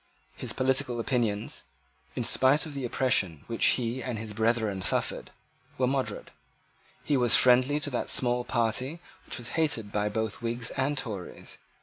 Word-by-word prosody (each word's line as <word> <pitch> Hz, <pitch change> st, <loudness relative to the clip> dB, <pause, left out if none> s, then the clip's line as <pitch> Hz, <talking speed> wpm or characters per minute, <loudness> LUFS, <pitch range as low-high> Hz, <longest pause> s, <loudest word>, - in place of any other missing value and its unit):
His -, -, -6 dB
political 130 Hz, -2 st, 0 dB
opinions, 115 Hz, -4 st, -1 dB, 0.5 s
in -, -, -1 dB
spite 135 Hz, +3 st, +3 dB
of 155 Hz, -, -7 dB
the 135 Hz, -2 st, -4 dB
oppression 100 Hz, -, +1 dB
which 115 Hz, -, -3 dB
he 120 Hz, +1 st, -2 dB
and 125 Hz, -3 st, -4 dB
his 110 Hz, -1 st, -6 dB
brethren 110 Hz, -2 st, +1 dB
had -, -, -4 dB
suffered, -, -, 0 dB, 0.5 s
were 130 Hz, -, +2 dB
moderate. 135 Hz, +1 st, -2 dB, 0.7 s
He 145 Hz, -, +1 dB
was 120 Hz, -3 st, +5 dB
friendly 130 Hz, +3 st, +4 dB
to 145 Hz, -, -2 dB
that 120 Hz, -, -2 dB
small 125 Hz, -1 st, +3 dB
party 125 Hz, +6 st, -1 dB, 0.3 s
which -, -, -3 dB
was 120 Hz, -2 st, -5 dB
hated 150 Hz, -10 st, 0 dB
by 105 Hz, 0 st, 0 dB
both 110 Hz, +1 st, -3 dB
Whigs 115 Hz, 0 st, -2 dB
and 140 Hz, +2 st, -1 dB
Tories. 105 Hz, -8 st, -6 dB
120 Hz, 160 wpm, -28 LUFS, 110-130 Hz, 0.7 s, was